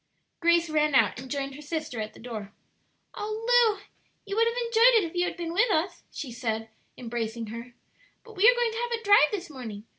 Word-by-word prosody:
Grace 340 Hz, 0 st, +3 dB
ran 305 Hz, -2 st, +1 dB
out 260 Hz, -, +3 dB
and 260 Hz, 0 st, -9 dB
joined 275 Hz, -1 st, -3 dB
her 290 Hz, -, -10 dB
sister 300 Hz, -6 st, -4 dB
at 215 Hz, 0 st, -6 dB
the -, -, -14 dB
door. 220 Hz, -4 st, -7 dB, 0.6 s
"Oh, 430 Hz, +2 st, -5 dB, 0.3 s
Lu, -, -, -16 dB, 0.4 s
you 400 Hz, -1 st, -4 dB
would 455 Hz, +1 st, +3 dB
have 465 Hz, +1 st, -2 dB
enjoyed 465 Hz, +1 st, +5 dB
it 440 Hz, -, +5 dB
if 330 Hz, -, -5 dB
you 355 Hz, 0 st, +2 dB
had -, -, -4 dB
been 335 Hz, -1 st, -4 dB
with 430 Hz, +7 st, +3 dB
us," 350 Hz, -1 st, 0 dB
she 270 Hz, -6 st, -7 dB
said, 225 Hz, -2 st, -3 dB, 0.3 s
embracing 230 Hz, -1 st, -4 dB
her. 235 Hz, +1 st, -9 dB, 0.5 s
"But 455 Hz, -2 st, -14 dB
we 410 Hz, +5 st, +6 dB
are -, -, +4 dB
going 480 Hz, -1 st, +1 dB
to 450 Hz, -, -6 dB
have 480 Hz, 0 st, -3 dB
a -, -, -17 dB
drive 405 Hz, -8 st, +6 dB
this 355 Hz, -5 st, -5 dB
morning. 225 Hz, -7 st, -8 dB
315 Hz, 220 wpm, -27 LUFS, -, 0.6 s, we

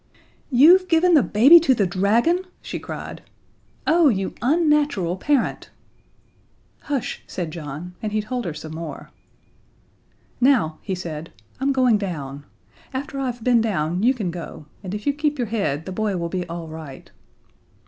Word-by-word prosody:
"You've 330 Hz, +8 st, +6 dB
given 345 Hz, +1 st, +4 dB
the 300 Hz, -, +7 dB
baby 270 Hz, +13 st, +7 dB
to 275 Hz, -6 st, +3 dB
the 205 Hz, -, +2 dB
dragon!" 210 Hz, -, +2 dB, 0.2 s
she -, -, -5 dB
cried. -, -, -7 dB, 0.6 s
"Oh, 325 Hz, -1 st, +5 dB
you 195 Hz, -5 st, -1 dB
unnatural 290 Hz, -, +2 dB
parent!" 275 Hz, +6 st, -1 dB, 1.1 s
"Hush," 275 Hz, -5 st, -3 dB
said 170 Hz, -4 st, -4 dB
John, 160 Hz, +2 st, -7 dB
and 215 Hz, -, -3 dB
he 215 Hz, -, 0 dB
told 245 Hz, +2 st, -4 dB
her 170 Hz, -, -3 dB
some 155 Hz, 0 st, -8 dB
more. 160 Hz, -3 st, -7 dB, 1.3 s
"Now," 240 Hz, -, +2 dB
he 190 Hz, -, -3 dB
said, 165 Hz, -3 st, -7 dB, 0.3 s
"I'm 275 Hz, +1 st, +1 dB
going 250 Hz, -5 st, +3 dB
down. 145 Hz, -7 st, -5 dB, 0.5 s
After 275 Hz, +1 st, -4 dB
I've 245 Hz, -3 st, -3 dB
been 240 Hz, -1 st, +4 dB
down 180 Hz, -5 st, -1 dB
you 255 Hz, +5 st, +3 dB
can 200 Hz, -8 st, -3 dB
go, 165 Hz, -2 st, -8 dB, 0.2 s
and 190 Hz, 0 st, -5 dB
if 210 Hz, -, -7 dB
you 285 Hz, -, +2 dB
keep 295 Hz, 0 st, -1 dB
your 240 Hz, -4 st, -2 dB
head 160 Hz, -9 st, -1 dB
the 190 Hz, -, -6 dB
boy 205 Hz, 0 st, -1 dB
will 170 Hz, -1 st, -3 dB
be 180 Hz, 0 st, -3 dB
all 170 Hz, -1 st, -6 dB
right." 155 Hz, -4 st, -10 dB
210 Hz, 160 wpm, -22 LUFS, 170-275 Hz, 1.3 s, the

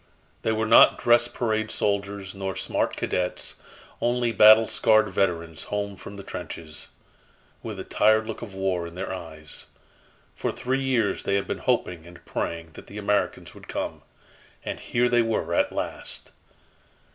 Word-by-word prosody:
They 110 Hz, -, +1 dB
were 110 Hz, 0 st, 0 dB
not 115 Hz, -, +7 dB
dress 120 Hz, 0 st, +4 dB
parade 110 Hz, -3 st, -1 dB
soldiers 100 Hz, -1 st, -2 dB
nor 95 Hz, -1 st, -4 dB
smart 95 Hz, -, -1 dB
cadets 90 Hz, 0 st, -2 dB, 0.4 s
only 120 Hz, 0 st, +1 dB
battle 110 Hz, +1 st, +8 dB
scarred 110 Hz, 0 st, +3 dB
veterans 85 Hz, -4 st, -1 dB
home 100 Hz, -1 st, -3 dB
from 100 Hz, -, -10 dB
the 100 Hz, -, -8 dB
trenches, 80 Hz, -4 st, -6 dB, 0.7 s
with -, -, -6 dB
the -, -, -5 dB
tired 110 Hz, 0 st, +3 dB
look -, -, -6 dB
of 105 Hz, -5 st, -8 dB
war 95 Hz, -3 st, -1 dB
in 85 Hz, -, -11 dB
their 95 Hz, -, -4 dB
eyes. 80 Hz, -4 st, -7 dB, 0.7 s
For -, -, -1 dB
three 130 Hz, +2 st, -1 dB
years 125 Hz, -6 st, +1 dB
they 100 Hz, -, 0 dB
had 100 Hz, -, +1 dB
been -, -, -3 dB
hoping 85 Hz, -2 st, -1 dB
and 85 Hz, 0 st, -14 dB
praying 85 Hz, -1 st, -3 dB
that -, -, -12 dB
the 100 Hz, -, -9 dB
Americans 105 Hz, 0 st, -1 dB
would -, -, -14 dB
come -, -, -4 dB, 0.6 s
and -, -, -4 dB
here 120 Hz, +1 st, +1 dB
they 120 Hz, -1 st, +4 dB
were 110 Hz, -7 st, -1 dB
at -, -, +2 dB
last! -, -, -5 dB
100 Hz, 160 wpm, -26 LUFS, 90-110 Hz, 0.7 s, battle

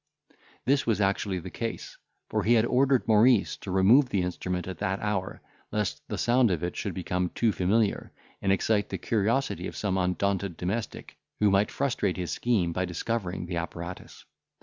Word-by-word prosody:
This 135 Hz, 0 st, +2 dB
was 110 Hz, -3 st, +2 dB
actually 100 Hz, -1 st, 0 dB
the 90 Hz, -, -7 dB
case; -, -, -5 dB, 0.3 s
for -, -, -1 dB
he 120 Hz, +2 st, +4 dB
had 110 Hz, 0 st, +4 dB
ordered 130 Hz, +1 st, +2 dB
Maurice 110 Hz, 0 st, +4 dB
to -, -, -9 dB
remove 105 Hz, +9 st, +5 dB
the 100 Hz, -6 st, 0 dB
instrument 90 Hz, 0 st, -3 dB
at 95 Hz, -, -6 dB
that 95 Hz, -1 st, -1 dB
hour, 100 Hz, -3 st, -3 dB, 0.3 s
lest 105 Hz, -2 st, -2 dB
the -, -, -4 dB
sound 120 Hz, 0 st, +3 dB
of 85 Hz, -3 st, -1 dB
it 90 Hz, -, -2 dB
should 100 Hz, -5 st, -4 dB
become 90 Hz, 0 st, -1 dB
too 115 Hz, -2 st, +2 dB
familiar, 100 Hz, +3 st, 0 dB, 0.3 s
and 95 Hz, -, +1 dB
excite 105 Hz, +2 st, +1 dB
the -, -, -3 dB
curiosity 115 Hz, +5 st, 0 dB
of -, -, -8 dB
some 95 Hz, -2 st, 0 dB
undaunted 95 Hz, 0 st, -1 dB
domestic, 100 Hz, +6 st, -4 dB, 0.2 s
who 105 Hz, -1 st, +4 dB
might 100 Hz, +2 st, +3 dB
frustrate 120 Hz, -9 st, -1 dB
his 90 Hz, -3 st, -3 dB
scheme 100 Hz, -9 st, 0 dB
by 95 Hz, -, -1 dB
discovering 90 Hz, +1 st, -3 dB
the 85 Hz, 0 st, -4 dB
apparatus. 85 Hz, +1 st, -7 dB
100 Hz, 175 wpm, -27 LUFS, 90-115 Hz, 0.3 s, remove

